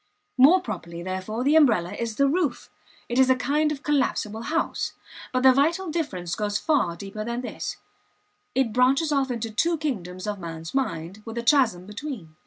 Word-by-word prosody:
More 310 +9 +8
properly, 170 - -6
therefore, 190 +6 -3
the 290 +4 +3
umbrella 225 - +4
is 225 0 -4
the 280 +3 +3
roof; 300 -3 -1 0.4
it 240 +2 0
is 260 0 +5
a 260 - +6
kind 295 +4 +1
of 285 -1 -5
collapsible 235 -7 0
house. 305 +7 -1 0.4
But 255 0 0
the 260 -1 +8
vital 325 +6 +1
difference 185 - -3
goes 205 +1 -1
far 210 - +1
deeper 200 +4 -6
than 235 +2 -3
this; 250 - -5 0.8
it 255 -4 +1
branches 270 +6 +3
off 275 -2 +1
into 230 -2 -3
two 330 +10 +1
kingdoms 185 - -4
of 205 -1 -3
man's 165 -2 -7
mind, 190 -7 -2
with 225 +1 -8
a 235 - -2
chasm 235 -10 +3
between. 210 - -7
240 Hz, 180 wpm, -25 LUFS, 195-280 Hz, 0.8 s, More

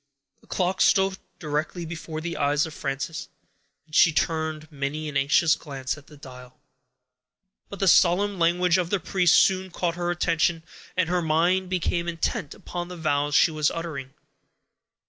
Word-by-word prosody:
The - - -24
clock 185 0 -1
stood 195 -1 +3 0.2
directly 155 +2 -3
before 160 -1 -6
the 170 +1 -4
eyes 145 +1 +1
of 160 - -8
Frances, 140 +5 -4 0.6
and 155 - -26
she 170 - +6
turned 155 0 -2
many 145 +2 -4
an 150 - -6
anxious 145 +4 +3
glance 135 -2 -5
at 150 -1 -16
the 150 - -15
dial; 125 -2 -13 1.1
but 200 - -8
the 195 - 0
solemn 185 +3 +4
language 175 +1 +3
of 175 -2 -1
the 200 - +1
priest 180 0 +3
soon 190 -1 +3
caught 175 -1 -2
her 175 0 -3
attention, 170 -1 +1 0.3
and 185 -2 +2
her 180 +1 0
mind 175 +4 +1
became 175 -1 -1
intent 165 -3 -2
upon 175 0 -6
the 180 0 -9
vows 145 -2 0
she 165 - +5
was 155 -1 +1
uttering. 150 -5 -6
165 Hz, 165 wpm, -25 LUFS, 150-180 Hz, 1.1 s, she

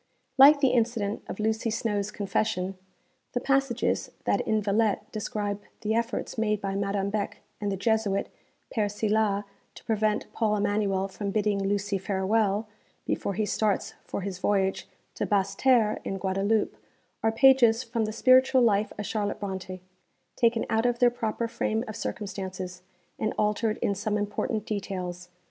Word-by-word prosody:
Like 285 +2 +8
the 270 - +5
incident 225 -4 0
of - - -6
Lucy 220 +1 0
Snowe's 210 -2 -1
'Confession,' 195 -2 -1 0.6
the 245 - +1
passages 270 -2 +1
that - - +1
in 220 - +2
Villette 210 +1 0
describe 205 -1 -3 0.2
the 220 0 0
efforts 235 0 -2
made 210 -2 +1
by 195 -1 -3
Madame 200 0 -1
Beck 210 -1 -2 0.2
and 205 -1 -1
the 195 - -2
Jesuit, 210 -1 +1 0.5
Père 210 -3 +1
Silas, 210 -1 +1 0.3
to - - -12
prevent 215 -1 0
Paul 215 -2 +1
Emanuel 200 -2 0
from 200 +1 -5
bidding 205 -1 +1
Lucy 200 0 0
farewell, 200 +2 +1 0.4
before 200 - -2
he 215 +2 0
starts 210 -1 0
for - - -4
his 190 -1 -5
voyage 195 -1 0 0.3
to - - -2
Basseterres 210 +3 +2
in 195 - -3
Guadeloupe, 195 +3 0 0.5
are 225 - +2
pages 245 -1 +5
from 230 -2 -1
the 215 - -3
spiritual 255 +3 +5
life 210 -2 +2
of 210 - -4
Charlotte 205 -1 -2
Brontë 190 -2 -5 0.5
taken 230 -1 +2
out 225 +2 +2
of 240 -1 0
their 245 0 +5
proper 230 -1 -2
frame 225 0 -1
of 215 - -6
circumstances, 190 -3 -5 0.4
and 215 - -1
altered 215 +1 +1
in 200 - +2
some 210 +2 -1
important 210 +1 -2
details. 180 -4 -4
210 Hz, 155 wpm, -27 LUFS, 200-225 Hz, 0.6 s, Like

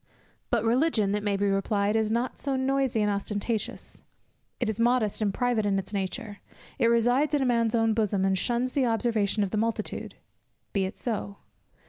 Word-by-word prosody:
But 235 -3 +1
Religion, 230 -4 +2
it 210 - 0
may 205 -1 0
be 200 - 0
replied, 200 +1 +1
is 220 -1 +1
not 235 +3 -2
noisy 265 -3 +1
and 210 - +2
ostentatious; 205 +2 -3 0.6
it 245 - 0
is 220 0 -2
modest 235 -3 +2
and 205 -2 +2
private 245 +1 0
in 200 -1 +1
its 195 +2 -5
nature; 205 +2 -4 0.4
it 230 - +4
resides 245 +6 +3
in 290 - +1
a - - +1
man's 235 -2 +2
own 225 -1 +3
bosom, 205 -3 +1
and 190 0 +2
shuns 240 +6 0
the 265 -2 +1
observation 225 -3 +1
of 195 - -3
the 215 - 0
multitude. 230 0 -3 0.6
Be 195 -2 +1
it 190 - -6
so. 205 -4 -4
220 Hz, 180 wpm, -27 LUFS, 205-245 Hz, 0.6 s, it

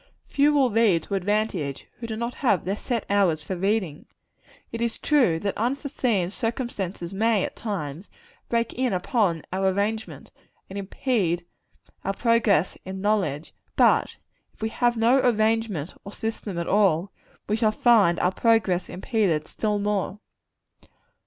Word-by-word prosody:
Few 290 +1 +3
will 275 -4 +3
read 205 -7 +3
to - - -7
advantage, 195 -7 -1
who 235 - -5
have 220 -1 -4
not 235 -3 0
their 195 +2 -1
set 235 0 -3
hours 185 -6 +2
for 190 - -4
reading. 190 -4 -1 0.6
It 230 - -5
is 235 -1 -1
true, 255 - +3
that 200 - -2
unforeseen 245 - -1
circumstances 210 -7 -3
may, 215 0 +2
at - - -4
times, 180 -5 -5 0.4
break 230 -1 0
in 255 -3 0
upon 185 - 0
our 190 +1 +1
arrangement, 210 +3 -3 0.4
and 200 - -4
impede 190 -4 -1 0.6
our 195 - -1
progress 225 -8 +2
in 190 0 -6
knowledge; 190 -8 -1 0.2
but - - +3 0.4
if - - -26
we 220 - 0
have 240 +1 +1
no 235 +4 +4
arrangement 220 - +1
or 200 - -8
system 215 -4 -4
at 170 - -2
all, 195 -3 +2 0.4
we 210 - +1
shall 220 -1 +2
find 215 -7 +4
our 180 - +2
progress 210 -4 +2
impeded 185 -7 0
still 210 -1 -1
more. 205 -1 -1
205 Hz, 145 wpm, -25 LUFS, 185-230 Hz, 0.6 s, no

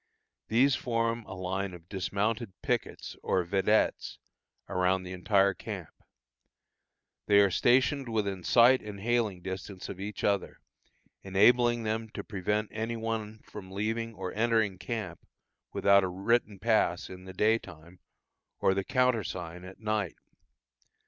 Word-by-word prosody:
These 130 +5 +4
form 115 -1 -1
a 95 - -8
line 95 +1 -3
of 85 -1 -15
dismounted 100 +2 -2
pickets, - - -2
or 95 - +1
vedettes, 100 +4 +1 0.5
around 95 0 +1
the 90 - -8
entire 95 +2 +3
camp. - - -7 1.4
They 100 0 +6
are 100 -1 +5
stationed 130 +4 +2
within 100 -5 -1
sight 125 +7 +6
and 105 -2 -8
hailing 110 -4 0
distance 95 0 -6
of 95 - -7
each 100 +2 -6
other, 100 -2 0 0.6
enabling 120 +5 +4
them 110 +1 -2
to - - -4
prevent 105 +2 -2
any 115 +2 -3
one 110 -1 -4
from 95 -3 -10
leaving 110 +3 -2
or 95 -2 -5
entering 110 -4 +1
camp 100 -6 -4 0.5
without 100 0 +4
a - - +1
written 100 +3 0
pass 95 -4 +1
in 90 0 -10
the 95 - -9
day 110 +4 +3
time, 85 -1 -14 0.6
or 95 - +3
the 100 0 -1
countersign 105 -9 -1
at 95 +1 -11
night. 105 -4 -1
100 Hz, 135 wpm, -29 LUFS, 95-115 Hz, 1.4 s, They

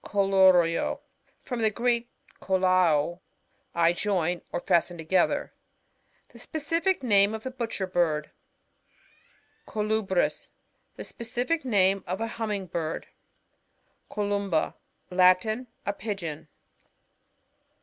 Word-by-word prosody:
CoLLURio. 190 -4 +3 0.2
— - - -39
^From 245 -3 -3
the 220 - +4
Greek, 235 +2 0 0.3
koUaS, 185 -4 +2 0.6
I 170 0 +4
join 180 -3 -1
or - - -2
fasten 175 -1 +1
together. 165 +3 +1 0.8
The - - -15
specific 330 +2 -1
name 205 -2 +4
of 220 - -8
the 260 - -4
Butcher 230 -6 -3
Bird. 165 -5 0 1.4
CoLUBRis. 215 -3 0 0.2
— - - -46
The - - -6
specific 245 +8 -3
name 195 -5 +2
of 185 +3 -3
a 225 - -1 0.2
Humming 210 -3 -2
Bird. 165 -2 -4 1.0
CoLUMBA. 200 -5 -1 0.2
— - - -44
^Latin. 185 +7 +3 0.2
A 200 - 0
Pigeon. 180 -8 -5
195 Hz, 110 wpm, -27 LUFS, 175-220 Hz, 1.4 s, the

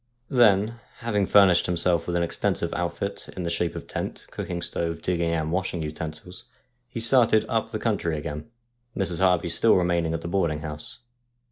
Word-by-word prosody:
Then, 115 -2 +4 0.2
having 105 -4 0
furnished 95 -4 +5
himself 85 -1 +1
with 90 - -1
an 85 - +2
extensive 85 - -1
outfit 90 +3 -3
in 90 - -3
the 85 - -2
shape 85 0 -1
of - - -6
tent, - - -5
cooking 85 -1 -4
stove, 85 -1 -2
digging 85 -2 0
and 80 -1 -1
washing 90 -2 -1
utensils, 80 +3 -6 0.4
he 115 - -5
started 115 -2 +4
up - - -1
the - - -3
country 80 -2 -1
again, 75 +5 -6 0.5
Mrs. 90 -4 -1
Harvey 90 -2 +3
still 110 +7 +4
remaining 85 -2 +1
at 80 - -4
the - - -5
boarding 85 -4 0
house. 75 +4 -5
85 Hz, 170 wpm, -25 LUFS, 85-95 Hz, 0.5 s, furnished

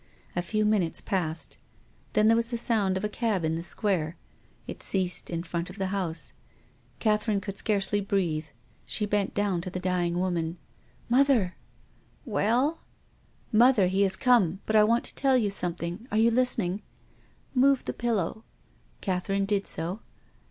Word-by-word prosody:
A 175 - +1
few 215 +4 0
minutes 205 -6 +2
passed. 165 -4 -2 0.5
Then 215 0 +4
there 225 - +6
was 230 0 +1
the 235 0 -3
sound 210 -5 +2
of 190 - -4
a - - +1
cab 210 -5 -1
in 160 - 0
the 165 - -3
Square. 175 -3 -1 0.5
It - - -8
ceased 185 -2 0
in 170 -1 -3
front 170 0 -4
of 185 - -11
the 190 -1 -2
house. 170 -5 -3 0.6
Catherine 215 -1 +1
could 195 0 -6
scarcely 205 -1 +1
breathe. 175 -6 -1 0.4
She 210 - 0
bent 205 -1 0
down 200 -4 0
to 185 - -5
the 185 - -4
dying 180 -2 0
woman. 175 -2 -1 0.2
" - - -32
Mother! 260 -10 +3 0.2
" - - -34
" - - -34
Well? 255 +10 +2 0.3
" - - -36
" - - -36
Mother, 230 -2 +5
he 190 +2 +1
has 190 -1 +3
come 200 -9 +3
— - - -33
but 220 - -1
I 215 - +7
want 230 +3 +2
to - - -4
tell 270 -2 +3
you 210 -5 +1
something 175 +3 -2
— - - -29
arc 215 - +2
you 230 +1 +5
listening? 225 -6 +1 0.2
" - - -33
" - - -36
Move 270 +1 +3
the - - -3
pillow." 220 -2 -1 0.6
Catherine 195 +1 -1
did 200 0 0
so. 175 +6 -3
195 Hz, 185 wpm, -27 LUFS, 180-220 Hz, 0.6 s, I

